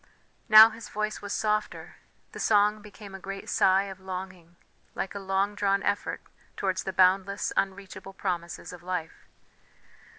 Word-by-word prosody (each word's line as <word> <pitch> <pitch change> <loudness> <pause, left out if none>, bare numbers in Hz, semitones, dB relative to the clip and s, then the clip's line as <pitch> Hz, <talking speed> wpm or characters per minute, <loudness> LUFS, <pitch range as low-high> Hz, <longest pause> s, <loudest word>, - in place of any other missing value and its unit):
Now 220 +1 +10
his 225 +1 -10
voice 215 0 -3
was 205 - -7
softer; 215 0 -2 0.3
the - - -9
song 210 0 +3
became 205 -1 -12
a 195 - -8
great 195 +1 -7
sigh 190 +1 +3
of 195 -1 -8
longing, 185 -2 -8 0.4
like 195 - -4
a 200 - -5
long 195 +1 0
drawn 200 -1 0
effort 205 0 -2 0.4
towards 185 -1 -2
the 190 - -2
boundless, 190 +2 +2
unreachable 195 0 -3
promises 175 -2 -4
of 180 - -11
life. 180 -2 -5
195 Hz, 145 wpm, -27 LUFS, 185-205 Hz, 0.4 s, Now